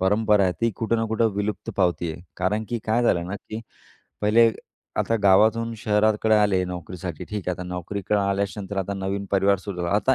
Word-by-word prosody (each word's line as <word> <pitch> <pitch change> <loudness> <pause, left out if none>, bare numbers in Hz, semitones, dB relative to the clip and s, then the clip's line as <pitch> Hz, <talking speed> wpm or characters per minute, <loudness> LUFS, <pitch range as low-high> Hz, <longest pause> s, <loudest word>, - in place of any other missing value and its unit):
परंपरा 105 +1 +3
आहे, 90 - +2
ती 115 0 +2
कुठं 115 +1 0
ना 115 - 0
कुठं 110 0 +2
विलुप्त 105 +1 -3
पावती 90 -3 +1
आहे. 85 - -11
कारण 105 +4 0
की 120 - -2
काय 110 +2 +2
झालं 85 -7 +2
ना, 100 +3 -4
की 110 +2 -8 0.6
पहिले 115 +2 +5 0.5
आता 115 - +1
गावातून 110 +4 +4
शहराकडे 110 0 +2
आले 100 -3 +3
नोकरीसाठी. 90 -1 -6
ठीक 105 -4 -5
आहे. 90 - 0
आता 90 - -6
नोकरीकडे 100 +3 -2
आल्याच्या 100 +1 -1
नंतर, 100 +1 -6
आता 100 +1 -2
नवीन 100 +1 -3
परिवार 100 0 +3
सुरू 100 -1 -7
झाला. 85 - -1
आता 130 +5 +3
100 Hz, 195 wpm, -24 LUFS, 95-110 Hz, 0.6 s, पहिले